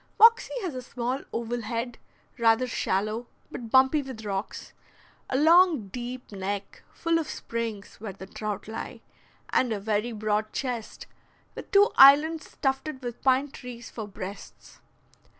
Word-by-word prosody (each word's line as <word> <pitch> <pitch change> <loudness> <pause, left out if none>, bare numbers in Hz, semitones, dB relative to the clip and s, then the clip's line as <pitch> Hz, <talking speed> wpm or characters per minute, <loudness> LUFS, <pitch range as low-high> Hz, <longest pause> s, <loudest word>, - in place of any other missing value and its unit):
Moxie 460 +2 +6
has 355 -6 -3
a 255 - -5
small 250 +2 -3
oval 235 +1 -3
head, 235 +1 -4 0.4
rather 230 +2 +4
shallow, 215 0 -1 0.2
but 230 -2 -7
bumpy 265 +4 +5
with 255 -5 -8
rocks; 195 0 -4 0.6
a 260 - +1
long, 320 - +5
deep 250 +2 -7
neck, 200 0 -5
full 335 0 0
of 315 - -4
springs, 225 -3 -5
where 215 -1 -5
the 190 0 -10
trout 205 0 -5
lie; 220 - -6 0.5
and 250 -2 +2
a 215 - -1
very 210 +3 -1
broad 215 0 -1
chest, 245 -4 -4 0.5
with - - -9
two 405 +1 +5
islands 300 +4 +6
tufted 270 0 -1
with 240 -1 -6
pine 265 +1 +2
trees 245 -3 -9
for 220 -3 -6
breasts. 195 0 -9
240 Hz, 145 wpm, -27 LUFS, 215-270 Hz, 0.6 s, Moxie